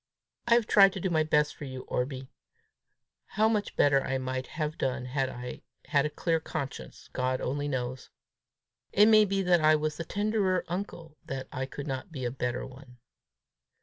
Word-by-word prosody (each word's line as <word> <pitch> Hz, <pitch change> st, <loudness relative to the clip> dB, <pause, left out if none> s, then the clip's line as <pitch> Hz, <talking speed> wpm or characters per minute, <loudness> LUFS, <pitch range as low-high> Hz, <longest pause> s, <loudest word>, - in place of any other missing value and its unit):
I 235 Hz, -, +6 dB
have 235 Hz, -2 st, +3 dB
tried 195 Hz, -2 st, +6 dB
to -, -, -4 dB
do 185 Hz, 0 st, -1 dB
my 160 Hz, -2 st, +3 dB
best 150 Hz, -1 st, +2 dB
for 145 Hz, -, -8 dB
you, 130 Hz, -1 st, -6 dB
Orbie: 130 Hz, +1 st, -3 dB, 1.1 s
how 215 Hz, +1 st, +5 dB
much 215 Hz, -2 st, -1 dB
better 140 Hz, -2 st, +4 dB
I 135 Hz, -, -1 dB
might 130 Hz, 0 st, -3 dB
have 155 Hz, -1 st, -2 dB
done 130 Hz, -1 st, -1 dB
had 130 Hz, +1 st, -1 dB
I 125 Hz, 0 st, -7 dB, 0.3 s
had 145 Hz, -1 st, +3 dB
a -, -, -6 dB
clear 165 Hz, +2 st, 0 dB
conscience, 155 Hz, -3 st, -6 dB
God 130 Hz, 0 st, 0 dB
only 145 Hz, +3 st, -2 dB
knows. 130 Hz, -2 st, -3 dB, 0.8 s
It 205 Hz, -, +6 dB
may 215 Hz, -1 st, +7 dB
be 195 Hz, 0 st, 0 dB
that 175 Hz, -2 st, +4 dB
I 155 Hz, 0 st, +6 dB
was 150 Hz, 0 st, -2 dB
the 165 Hz, -, -3 dB
tenderer 200 Hz, 0 st, 0 dB
uncle 170 Hz, -4 st, -6 dB
that 135 Hz, -4 st, -5 dB
I 130 Hz, -1 st, -3 dB
could 140 Hz, +1 st, -7 dB
not 135 Hz, +5 st, -4 dB
be 130 Hz, -5 st, -5 dB
a 120 Hz, -, -1 dB
better 125 Hz, -1 st, -3 dB
one." 130 Hz, -1 st, -13 dB
150 Hz, 185 wpm, -29 LUFS, 130-180 Hz, 1.1 s, may